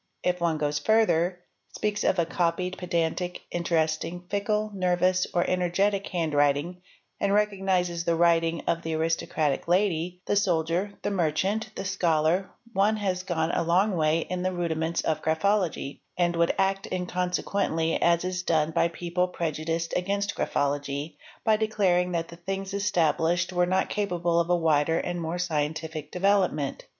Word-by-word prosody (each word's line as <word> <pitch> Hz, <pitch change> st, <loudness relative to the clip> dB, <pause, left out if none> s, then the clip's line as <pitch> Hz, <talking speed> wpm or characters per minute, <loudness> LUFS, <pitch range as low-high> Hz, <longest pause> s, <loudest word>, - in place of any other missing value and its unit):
If 180 Hz, -1 st, 0 dB
one 165 Hz, -2 st, +1 dB
goes 150 Hz, -1 st, -1 dB
further— 180 Hz, -5 st, +2 dB, 0.3 s
speaks 210 Hz, -1 st, -1 dB
of -, -, +2 dB
a 170 Hz, -, +2 dB
copied, 175 Hz, +2 st, -1 dB
pedantic, 175 Hz, 0 st, -1 dB
interesting, 165 Hz, 0 st, -1 dB
fickle, 210 Hz, +1 st, 0 dB
nervous, 185 Hz, -1 st, +1 dB
or 175 Hz, -, +1 dB
energetic 190 Hz, +3 st, +1 dB
handwriting 155 Hz, 0 st, 0 dB, 0.4 s
and 200 Hz, 0 st, +2 dB
recognises 190 Hz, -4 st, +1 dB
the 170 Hz, 0 st, +1 dB
writing 165 Hz, -1 st, +2 dB
of 170 Hz, 0 st, 0 dB
the 160 Hz, -1 st, -3 dB
aristocratic 160 Hz, -2 st, 0 dB
lady, 180 Hz, -1 st, 0 dB
the -, -, +1 dB
soldier, 180 Hz, 0 st, +1 dB
the -, -, -1 dB
merchant, 195 Hz, +5 st, 0 dB
the -, -, -5 dB
scholar, 175 Hz, -1 st, +1 dB, 0.2 s
one 210 Hz, +2 st, +2 dB
has 190 Hz, -3 st, -1 dB
gone 170 Hz, -3 st, -1 dB
a -, -, 0 dB
long 185 Hz, +4 st, +2 dB
way 155 Hz, 0 st, +2 dB
in 180 Hz, +2 st, -4 dB
the 185 Hz, +1 st, 0 dB
rudiments 165 Hz, -2 st, -1 dB
of 160 Hz, -, -1 dB
graphology, 165 Hz, -2 st, 0 dB, 0.2 s
and 175 Hz, -1 st, +1 dB
would 170 Hz, 0 st, +2 dB
act 195 Hz, 0 st, 0 dB
inconsequently, 180 Hz, -2 st, -1 dB
as 170 Hz, +1 st, +3 dB
is 185 Hz, 0 st, -2 dB
done 160 Hz, -3 st, +1 dB
by 165 Hz, -, +2 dB
people 175 Hz, +1 st, -1 dB
prejudiced 165 Hz, -1 st, -3 dB
against 200 Hz, +2 st, -1 dB
graphology, 145 Hz, +1 st, -2 dB, 0.3 s
by 220 Hz, -1 st, +4 dB
declaring 195 Hz, -5 st, +1 dB
that 165 Hz, -1 st, -2 dB
the 170 Hz, -, -11 dB
things 195 Hz, +2 st, -4 dB
esta 195 Hz, -7 st, +2 dB
blished 175 Hz, +2 st, +1 dB
were 175 Hz, 0 st, +2 dB
not 185 Hz, +1 st, +1 dB
capable 175 Hz, -4 st, 0 dB
of 170 Hz, 0 st, 0 dB
a 175 Hz, -, +4 dB
wider 160 Hz, -1 st, +2 dB
and 175 Hz, 0 st, -2 dB
more 165 Hz, +2 st, -3 dB
scientific 155 Hz, -2 st, -3 dB
development. 180 Hz, -7 st, +1 dB
175 Hz, 155 wpm, -27 LUFS, 165-190 Hz, 0.4 s, by